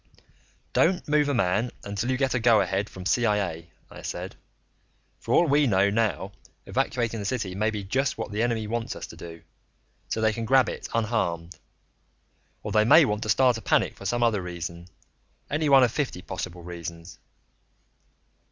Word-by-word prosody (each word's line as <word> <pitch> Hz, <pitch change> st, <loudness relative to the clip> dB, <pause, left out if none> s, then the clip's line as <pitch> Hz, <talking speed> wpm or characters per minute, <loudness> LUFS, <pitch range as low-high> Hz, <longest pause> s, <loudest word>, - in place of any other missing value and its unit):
"Don't 180 Hz, +2 st, +2 dB
move 150 Hz, -1 st, +2 dB
a -, -, +1 dB
man 110 Hz, +3 st, +1 dB
until 100 Hz, +5 st, -3 dB
you 130 Hz, -, +1 dB
get 135 Hz, -1 st, +1 dB
a 125 Hz, -, +1 dB
go 115 Hz, -1 st, +5 dB
ahead 100 Hz, +1 st, -1 dB
from 95 Hz, -1 st, -10 dB
CIA," 100 Hz, -7 st, 0 dB, 0.2 s
I -, -, -10 dB
said. -, -, -6 dB, 0.8 s
"For -, -, -6 dB
all 175 Hz, -, +5 dB
we 145 Hz, 0 st, +3 dB
know 100 Hz, -2 st, +3 dB
now, 105 Hz, -3 st, 0 dB, 0.3 s
evacuating 115 Hz, -2 st, -1 dB
the 100 Hz, -, -5 dB
city 110 Hz, -7 st, -2 dB
may 105 Hz, +3 st, 0 dB
be 105 Hz, -2 st, -4 dB
just 130 Hz, +7 st, -1 dB
what -, -, -5 dB
the 105 Hz, +2 st, -1 dB
enemy 115 Hz, -2 st, 0 dB
wants 115 Hz, +1 st, -3 dB
us -, -, -6 dB
to -, -, -12 dB
do 85 Hz, -1 st, -10 dB, 0.6 s
so -, -, -2 dB
they 110 Hz, 0 st, +2 dB
can 115 Hz, +1 st, -4 dB
grab 130 Hz, +2 st, +4 dB
it -, -, -6 dB
unharmed. 90 Hz, -7 st, -1 dB, 1.1 s
Or -, -, -4 dB
they 110 Hz, 0 st, +4 dB
may 155 Hz, +8 st, +7 dB
want 105 Hz, -3 st, -1 dB
to 110 Hz, -, -4 dB
start 125 Hz, +2 st, +3 dB
a -, -, -12 dB
panic -, -, +1 dB
for 100 Hz, -, -6 dB
some 120 Hz, +3 st, 0 dB
other 110 Hz, -4 st, +2 dB
reason, 85 Hz, -1 st, -6 dB, 0.6 s
any 150 Hz, +1 st, +1 dB
one 135 Hz, -2 st, +7 dB
of 120 Hz, -, +3 dB
fifty 125 Hz, -11 st, -3 dB
possible 90 Hz, -2 st, -6 dB
reasons." 85 Hz, 0 st, -8 dB
110 Hz, 180 wpm, -26 LUFS, 95-125 Hz, 1.1 s, may